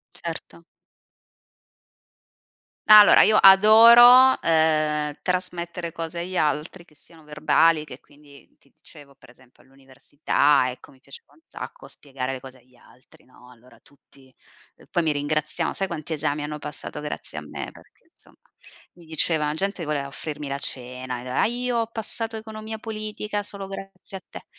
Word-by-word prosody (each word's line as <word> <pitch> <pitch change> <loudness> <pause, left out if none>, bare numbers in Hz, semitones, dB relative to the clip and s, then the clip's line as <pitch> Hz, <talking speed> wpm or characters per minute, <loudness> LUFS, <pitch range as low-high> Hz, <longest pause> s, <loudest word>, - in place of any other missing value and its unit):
Certo. 170 0 -9 2.2
Allora 210 -1 +8
io 215 - +4
adoro, 235 +6 +7
uhm, 155 -2 +1
trasmettere 175 -2 -3
cose 165 +1 -6
agli 185 +2 -6
altri 155 +4 -2
che 155 - -25
siano 160 +3 -20
verbali, 150 +1 +1
che, 150 - -12
quindi, 145 -1 -20
ti 140 - -31
dicevo, 145 -3 -17
per 135 - -21
esempio, 125 0 -23
all'università, 135 +1 -1
ecco, 125 - -14
mi 130 - -24
piaceva 135 - -13
un - - -26
sacco - - -10
spiegare 135 -2 -7
le 130 - -7
cose 130 0 -13
agli 125 +1 -28
altri, 125 +1 -23
no, 125 -1 -20
allora 120 -1 -20
tutti, 135 -2 -24 0.4
uhm, - - -21
poi 175 - 0
mi 160 -2 0
ringraziavan 155 +3 -3
sai 195 - -1
quanti 165 -3 -6
esami 150 0 -3
hanno 150 0 -6
passato 150 0 -7
grazie 150 - -7
a - - -7
me 75 - -8
perché, - - -21
insomma, - - -23 0.6
mi 175 - -18
diceva 160 -1 0
la 150 - -2
gente 195 +1 -2
voleva 150 -2 -3
offrirmi 150 +1 -7
la 140 0 -4
cena, 125 -1 -4 0.2
"ah - - +3
io 245 +1 -2
ho 230 - -1
passato 225 0 -6
economia 220 0 -8
politica 215 -1 -5
solo 200 -1 -9
grazie 195 0 -10
a 190 - -10
te", - - -11
155 Hz, 155 wpm, -23 LUFS, 140-195 Hz, 2.2 s, Allora